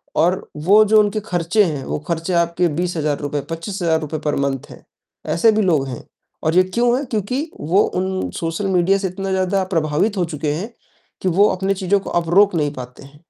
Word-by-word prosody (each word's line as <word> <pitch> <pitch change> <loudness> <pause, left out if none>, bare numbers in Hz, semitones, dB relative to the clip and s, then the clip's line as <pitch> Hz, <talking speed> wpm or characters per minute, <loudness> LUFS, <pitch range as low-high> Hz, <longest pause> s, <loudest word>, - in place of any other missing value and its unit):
और 175 +4 +1 0.2
वो 210 +3 +7
जो 215 +1 +5
उनके 210 0 +1
ख़र्चे 180 +3 +1
हैं, 150 -7 -2
वो - - -3
ख़र्चे 170 +2 -2
आपके 170 +1 +2
₹20,000, 150 -3 -2
₹25,000 165 -3 -2
पर 150 - +1
मंथ 135 -2 -4
है। - - -13 0.5
ऐसे 220 +6 +5
भी 215 - +2
लोग 155 -8 +2
हैं 125 -3 -7 0.4
और 160 +2 +1
ये 185 - +6
क्यों 240 +6 +1
है, 280 - -3
क्योंकि 250 - -2
वो 180 +7 +2 0.2
उन 190 0 -2
सोशल 165 +4 -2
मीडिया 190 +1 +3
से 195 -1 -2
इतना 195 +1 -4
ज़्यादा 190 +1 +1
प्रभावित 160 +7 +1
हो 175 - +1
चुके 150 0 -1
हैं, 210 +9 -5 0.5
कि 190 - -1
वो 200 +5 +4
अपनी 190 +1 0
चीज़ों 195 +1 +1
को - - -8
अब 165 - -7
रोक 200 -2 +5
नहीं 150 -2 0
पाते 125 +1 -9
हैं। 140 +2 -16
180 Hz, 200 wpm, -20 LUFS, 160-200 Hz, 0.5 s, वो